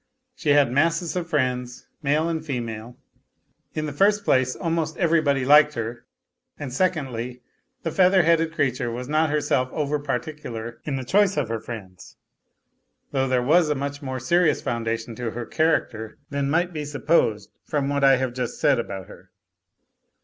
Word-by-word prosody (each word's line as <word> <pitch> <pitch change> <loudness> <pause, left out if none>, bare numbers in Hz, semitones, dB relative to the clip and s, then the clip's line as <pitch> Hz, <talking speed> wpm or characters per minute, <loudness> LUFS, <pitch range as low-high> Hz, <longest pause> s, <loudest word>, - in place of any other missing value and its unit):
She 160 - -3
had 145 -4 +4
masses 165 +5 +1
of 175 -2 -3
friends, 125 -5 -1 0.2
male 150 +2 +1
and 160 -2 -2
female. 120 -4 -5 0.8
In 155 - -1
the 150 - -4
first 205 +6 +3
place, 130 -5 +2
almost 165 -2 -2
everybody 155 -6 +2
liked 150 +2 +6
her; 115 +1 -5 0.5
and 135 -4 -6
secondly, 125 -7 -2 0.4
the 165 - -2
feather 185 +1 +4
headed 165 0 +3
creature 130 -6 0
was 125 +2 -5
not 155 +2 +2
herself 145 -4 +1
over 150 -1 -1
particular 125 -4 -5
in 145 - -2
the 130 - -3
choice 195 +7 +2
of 135 -6 0
her 115 -1 -2
friends, 95 -6 -10 0.9
though 135 -1 +1
there 130 -1 +1
was 160 +4 +4
a 150 - +1
much 140 +1 -4
more 130 -2 -4
serious 170 +7 +2
foundation 115 0 -3
to 120 -2 -3
her 120 +1 -5
character 115 -9 0
than 140 -1 -1
might 175 +4 +1
be 150 -2 -3
suppled 145 -7 +1 0.2
from 145 -2 -1
what 140 0 0
I 135 -1 +7
have 130 -1 -2
just 125 -2 -4
said - - +3
about 100 -5 -5
her. - - -15
140 Hz, 165 wpm, -24 LUFS, 125-160 Hz, 0.9 s, I